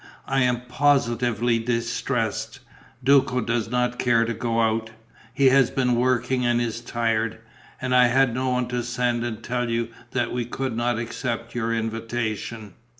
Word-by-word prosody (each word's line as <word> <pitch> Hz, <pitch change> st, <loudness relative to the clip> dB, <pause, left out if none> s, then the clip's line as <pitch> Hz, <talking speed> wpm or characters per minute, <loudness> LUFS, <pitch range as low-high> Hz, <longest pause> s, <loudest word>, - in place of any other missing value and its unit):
"I 135 Hz, 0 st, +1 dB
am 125 Hz, -1 st, +2 dB
positively 120 Hz, -3 st, +1 dB
distressed: 115 Hz, 0 st, -2 dB, 0.4 s
Duco 130 Hz, -1 st, +4 dB
does 115 Hz, -1 st, -1 dB
not 125 Hz, 0 st, 0 dB
care 115 Hz, -2 st, +3 dB
to 115 Hz, -, -2 dB
go 115 Hz, +1 st, -1 dB
out 110 Hz, 0 st, 0 dB, 0.4 s
he 135 Hz, +2 st, +4 dB
has 135 Hz, -1 st, +4 dB
been 125 Hz, -2 st, +1 dB
working 125 Hz, +1 st, +1 dB
and 120 Hz, 0 st, +2 dB
is 120 Hz, -1 st, -2 dB
tired 115 Hz, -2 st, -1 dB, 0.4 s
and 130 Hz, 0 st, -2 dB
I 125 Hz, -1 st, +6 dB
had 130 Hz, 0 st, +3 dB
no 130 Hz, +1 st, -1 dB
one 125 Hz, -1 st, 0 dB
to 125 Hz, 0 st, -1 dB
send 120 Hz, 0 st, -1 dB
and 115 Hz, -2 st, -5 dB
tell 120 Hz, -1 st, -2 dB
you 115 Hz, 0 st, -1 dB, 0.2 s
that 120 Hz, -2 st, -1 dB
we 125 Hz, 0 st, -1 dB
could 130 Hz, 0 st, -3 dB
not 120 Hz, 0 st, 0 dB
accept 115 Hz, 0 st, -4 dB
your 115 Hz, -1 st, -1 dB
invitation." 115 Hz, -2 st, -3 dB
120 Hz, 160 wpm, -24 LUFS, 115-125 Hz, 0.4 s, I